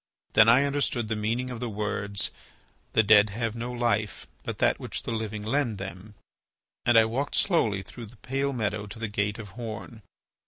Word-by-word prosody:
Then 110 +1 +7
I 125 +4 +6
understood 140 -5 0
the 110 - 0
meaning 115 +4 -1
of 120 - -5
the 120 -1 -3
words, 100 -1 -2 0.6
"The 110 - +5
dead 105 0 +6
have 115 +2 -2
no 120 +1 -4
life, 115 -3 0 0.2
but - - -5
that - - +2
which - - -5
the - - -3
living 110 -2 -3
lend 120 -1 0
them," 95 +2 -8 0.7
and 120 -1 +6
I 110 - +7
walked 130 +6 -2
slowly 110 - +2
through 115 +4 -9
the 115 +3 -16
pale 135 +4 -1
meadow 105 -4 -2
to 105 - -9
the 115 0 -3
gate 105 0 -1
of 110 -3 -8
horn. 115 +1 -7
110 Hz, 190 wpm, -27 LUFS, 105-120 Hz, 0.7 s, Then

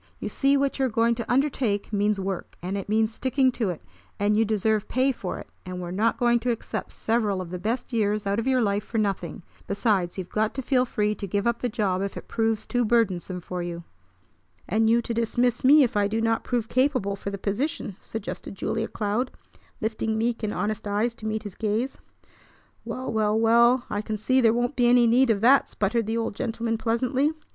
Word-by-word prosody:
You - - -4
see 275 0 +2
what 275 0 0
you 265 - +3
are - - 0
going 230 +1 +2
to 235 0 -4
undertake 245 -6 0
means 205 0 +1
work, 190 -1 -4
and 185 +3 -4
it 200 0 -5
means 220 +1 +2
sticking 260 +2 +2
to 230 -5 -1
it; 175 - -5 0.4
and 205 +1 +2
you 220 - +4
deserve 215 0 0
pay 260 +2 +2
for 200 -7 -5
it, - - -9 0.2
and 180 0 -6
we're 175 -1 -5
not 215 +5 +1
going 240 -1 +3
to 245 +2 -2
accept 230 -2 -3
several 220 -4 0
of 180 -2 -6
the 180 - -4
best 235 +6 -3
years 210 -2 +1
out 200 +2 0
of 230 - -2
your 260 -2 +3
life 205 0 0
for 225 - -5
nothing. 195 -6 -2 0.2
Besides, 200 -4 0
you've 185 -2 -6
got 215 0 0
to 265 - -3
feel 255 -1 +2
free 210 -3 0
to 205 -1 -6
give 200 +3 -1
up 235 0 +1
the 245 - -1
job 200 -5 0
if 200 0 -3
it - - -9
proves 225 -1 0
too 245 -1 0
burdensome 195 -6 +1
for 180 +1 -5
you." 170 -1 -5 0.8
"And 220 +3 +2
you 235 +1 +3
to 235 - -3
dismiss 240 +1 0
me 285 +3 +7
if 245 -2 -1
I 205 -1 +3
do 220 +2 -1
not 225 0 +1
prove 240 -3 -1
capable 255 -6 +1
for 200 - -5
the 200 - -4
position," 205 - -2
suggested 220 -2 -6
Julia 225 +3 -2
Cloud, 215 +4 -1 0.5
lifting 220 0 -1
meek 230 +1 0
and 215 -2 -1
honest 210 0 -2
eyes 210 +4 0
to 220 -1 -7
meet 215 0 -2
his 205 -3 -7
gaze. 220 +6 -2 0.8
"Well, 260 -1 -4
well, 215 -1 +2
well, 235 +2 +4
I 205 - -2
can 215 0 -4
see 255 +5 +2
there 225 -2 +5
won't 245 +4 0
be 245 -1 +3
any 245 0 +6
need 240 +3 +4
of 205 -3 +2
that!" 265 +4 +5
sputtered 215 +2 0
the 225 +1 -1
old 225 -2 -2
gentleman 225 +1 -2
pleasantly. 255 +6 +1
225 Hz, 220 wpm, -25 LUFS, 205-240 Hz, 0.8 s, me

